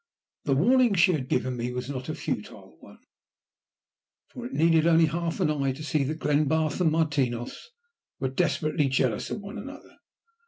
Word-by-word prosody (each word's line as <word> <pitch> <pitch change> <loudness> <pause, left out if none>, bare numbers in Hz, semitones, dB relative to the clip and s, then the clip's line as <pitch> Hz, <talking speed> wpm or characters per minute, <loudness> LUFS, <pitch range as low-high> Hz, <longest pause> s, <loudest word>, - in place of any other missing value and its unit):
The 135 - +2
warning 240 - +4
she 185 +1 +5
had 140 -7 -2
given 130 -1 0
me 120 +1 -3
was 125 0 -4
not 135 0 -5
a 155 - -2
futile - - -6
one, - - -15 1.3
for 245 -1 -7
it - - -12
needed 165 0 +3
only 165 -1 +5
half 165 +1 -2
an 150 - +2
eye 140 -3 0
to 150 +4 -9
see 155 -1 0
that 155 +3 -3
Glenbarth 155 +2 +1
and 165 -3 +3
Martinos 140 - -1 0.5
were 130 - -1
desperately 155 0 0
jealous 130 -4 0
of - - -4
one 200 +1 -8
another. 285 +2 -11
155 Hz, 170 wpm, -27 LUFS, 135-170 Hz, 1.3 s, she